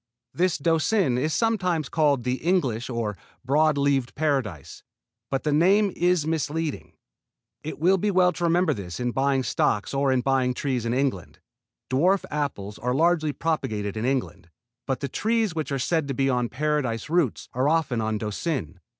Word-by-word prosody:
This 180 Hz, -1 st, +1 dB
Doucin 160 Hz, -, +1 dB
is 155 Hz, +4 st, 0 dB
sometimes 180 Hz, -, 0 dB
called 145 Hz, -5 st, +1 dB
the 125 Hz, +1 st, -1 dB
English 130 Hz, -10 st, 0 dB
or 115 Hz, -4 st, -2 dB, 0.3 s
Broad 150 Hz, +3 st, +3 dB
Leaved 140 Hz, -3 st, +1 dB
Paradise, 135 Hz, -, -2 dB, 0.5 s
but 135 Hz, -, -2 dB
this 150 Hz, -, +1 dB
name 195 Hz, +5 st, +4 dB
is 175 Hz, -2 st, +2 dB
misleading. 160 Hz, -1 st, -2 dB, 0.7 s
It 155 Hz, -, -5 dB
will 185 Hz, +5 st, +3 dB
be 210 Hz, -, 0 dB
well 180 Hz, -2 st, +4 dB
to 175 Hz, -, -2 dB
remember 175 Hz, +2 st, +3 dB
this 90 Hz, -2 st, -7 dB
in 125 Hz, 0 st, -1 dB
buying 135 Hz, +1 st, +1 dB
stocks 110 Hz, -2 st, 0 dB
or 135 Hz, 0 st, +2 dB
in 130 Hz, -1 st, +2 dB
buying 130 Hz, -1 st, +1 dB
trees 125 Hz, -5 st, -2 dB
in 115 Hz, -, 0 dB
England. 130 Hz, -10 st, -2 dB, 0.5 s
Dwarf 180 Hz, +9 st, +2 dB
apples 120 Hz, -9 st, -3 dB
are 125 Hz, +2 st, -1 dB
largely 160 Hz, 0 st, +2 dB
propagated 110 Hz, -11 st, -2 dB
in 110 Hz, +1 st, -2 dB
England, 130 Hz, -9 st, -2 dB, 0.4 s
but 135 Hz, -2 st, -2 dB
the 140 Hz, -, -1 dB
trees 220 Hz, -, 0 dB
which 155 Hz, -2 st, -3 dB
are 140 Hz, -, 0 dB
said 155 Hz, +3 st, 0 dB
to 135 Hz, -, -3 dB
be 135 Hz, 0 st, +1 dB
on 125 Hz, -1 st, 0 dB
Paradise 145 Hz, -6 st, -1 dB
roots 160 Hz, -6 st, 0 dB
are 130 Hz, +3 st, +1 dB
often 150 Hz, -8 st, +1 dB
on 110 Hz, 0 st, -1 dB
Doucin. 110 Hz, -, -3 dB
140 Hz, 170 wpm, -25 LUFS, 125-165 Hz, 0.7 s, name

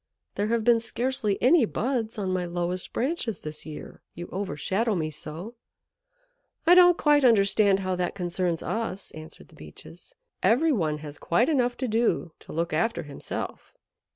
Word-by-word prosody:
There 205 Hz, -, -1 dB
have 230 Hz, 0 st, 0 dB
been 235 Hz, 0 st, +5 dB
scarcely 235 Hz, -2 st, -2 dB
any 280 Hz, +3 st, +6 dB
buds 230 Hz, 0 st, -2 dB
on 190 Hz, -3 st, -1 dB
my 185 Hz, -1 st, 0 dB
lowest 175 Hz, +1 st, -3 dB
branches 250 Hz, -, -2 dB
this 155 Hz, 0 st, -8 dB
year, 155 Hz, -, -9 dB
you 175 Hz, -, -6 dB
overshadow 195 Hz, +3 st, -1 dB
me 155 Hz, -3 st, -2 dB
so." 160 Hz, +8 st, -6 dB, 1.1 s
"I 345 Hz, -, +7 dB
don't 355 Hz, -1 st, +7 dB
quite 295 Hz, -1 st, +4 dB
understand 200 Hz, -3 st, +4 dB
how 185 Hz, -1 st, -1 dB
that 180 Hz, +1 st, -2 dB
concerns 175 Hz, -2 st, -1 dB
us," 220 Hz, -4 st, -3 dB
answered 155 Hz, +1 st, -12 dB
the -, -, -18 dB
Beeches. -, -, -13 dB, 0.3 s
"Every 310 Hz, +8 st, +3 dB
one 160 Hz, -, 0 dB
has 145 Hz, 0 st, -9 dB
quite 235 Hz, -, +2 dB
enough 245 Hz, -5 st, +1 dB
to 260 Hz, -, -2 dB
do 225 Hz, -6 st, 0 dB
to -, -, -13 dB
look 165 Hz, +1 st, -2 dB
after 170 Hz, +1 st, 0 dB
himself. 145 Hz, -2 st, -6 dB
205 Hz, 160 wpm, -26 LUFS, 175-240 Hz, 1.1 s, I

